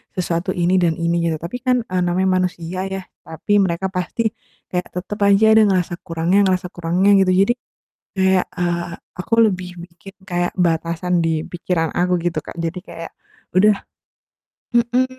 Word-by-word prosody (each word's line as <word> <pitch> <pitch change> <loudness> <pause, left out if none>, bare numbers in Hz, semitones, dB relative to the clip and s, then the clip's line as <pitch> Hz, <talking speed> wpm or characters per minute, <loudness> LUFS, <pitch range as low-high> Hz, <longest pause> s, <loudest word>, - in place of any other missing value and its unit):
sesuatu 175 0 -2
ini 175 +2 +2
dan 170 -2 +2
ini, 170 0 0
gitu. 160 - -1
Tapi 170 +9 -6
kan, 255 0 +3
eee, 185 -3 -1
namanya 185 +2 +1
manusia 180 -1 -3
ya, 190 0 -4 0.3
tapi 160 +5 -3
mereka 170 +1 -2
pasti 180 +4 -2 0.5
kayak 180 0 -2
tetap 185 +3 -5
aja 200 +2 +5
ada 220 - +6
ngerasa 180 -3 +1
kurangnya 165 +3 0
ngerasa 185 0 0
kurangnya, 175 +3 +1
gitu. 185 -1 +3
Jadi, 240 - +2 0.6
kayak, 190 -1 +2
eee, 170 -1 -1 0.3
aku 185 - -4 0.2
lebih 185 -2 -5
bikin 175 +3 -13
kayak 175 0 0
batasan 170 0 0
di 160 -1 0
pikiran 170 -2 -1
aku, 180 +1 +2
gitu, 170 -2 -1
Kak, - - -9
jadi 165 +2 -3
kayak 165 - -8 0.5
udah 210 +2 +6 1.0
mhm, 240 +1 +3
180 Hz, 160 wpm, -20 LUFS, 170-190 Hz, 1.0 s, ada